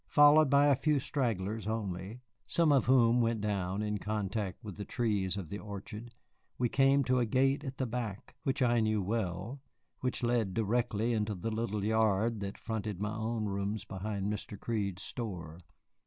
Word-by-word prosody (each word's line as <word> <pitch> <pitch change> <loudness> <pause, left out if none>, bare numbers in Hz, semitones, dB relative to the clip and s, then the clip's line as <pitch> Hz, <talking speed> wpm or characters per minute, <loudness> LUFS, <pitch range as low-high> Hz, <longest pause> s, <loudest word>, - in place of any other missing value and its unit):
Followed 145 0 +7
by 140 +1 +5
a 145 -1 +5
few 150 +2 +2
stragglers 110 -6 -1
only 105 +1 -4 0.3
(some 165 -3 +3
of 135 -5 +3
whom 125 -2 +5
went 115 -1 +1
down 100 -1 -1
in 105 -1 -2
contact 105 -1 -3
with 105 -4 -7
the 105 - -5
trees 100 -5 0
of 95 -4 -5
the 100 - -5
orchard), 105 +3 -8 0.4
we 125 - +2
came 135 +3 +4
to 125 0 +2
a 120 - +2
gate 135 +4 +2
at 135 -2 -6
the 130 - 0
back 115 -4 -5
which 135 0 0
I 120 -1 +3
knew 110 -2 +1
well, 105 +4 -3 0.4
which 125 -1 -2
led 120 -5 +1
directly 115 +1 +1
into 105 -1 -1
the 105 +5 -3
little 110 -2 -2
yard 110 0 +2
that 100 0 -5
fronted 110 -4 -4
my 105 +1 -2
own 110 0 -2
rooms 100 +1 -2
behind 100 +1 -4
Mr. 105 -1 -6
Crede's 100 -6 -2
store. 90 -8 -5
110 Hz, 175 wpm, -32 LUFS, 100-120 Hz, 0.4 s, Followed